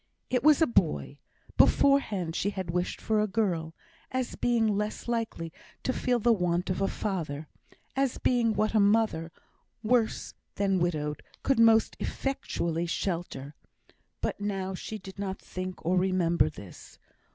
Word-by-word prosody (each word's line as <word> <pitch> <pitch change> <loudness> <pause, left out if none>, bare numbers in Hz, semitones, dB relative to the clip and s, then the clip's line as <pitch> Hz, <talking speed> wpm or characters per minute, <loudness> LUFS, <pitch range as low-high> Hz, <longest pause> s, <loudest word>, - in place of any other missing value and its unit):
It 250 - +2
was 305 +1 +6
a - - +6
boy; 160 - 0 0.4
beforehand 205 -12 +3
she 200 - 0
had 190 -4 -4
wished 180 +1 -1
for 215 -1 +1
a 210 - +1
girl, 175 -6 -1 0.3
as 255 -1 -2
being 235 -2 +2
less 210 +2 -2
likely 225 -9 -2 0.3
to 260 - 0
feel 250 -1 +1
the 235 +1 +4
want 180 -2 0
of 185 - -2
a 195 - +3
father 160 -9 -3 0.5
as 270 -2 +1
being 235 -3 +2
what 215 +1 +1
a 220 - +4
mother, 200 -5 +2 0.5
worse 225 0 +1 0.2
than 195 -2 +1
widowed, 150 -4 -1 0.2
could 270 -3 +2
most 225 -1 +5
effectually 170 -11 -2
shelter. 165 -6 -3 0.7
But - - -2
now 195 -2 -2
she 215 +4 -5
did 190 -1 -11
not 195 -1 -3
think 185 -2 -6
or 180 +2 +2
remember 175 -4 +2
this. 100 - -12
195 Hz, 150 wpm, -29 LUFS, 170-225 Hz, 0.7 s, was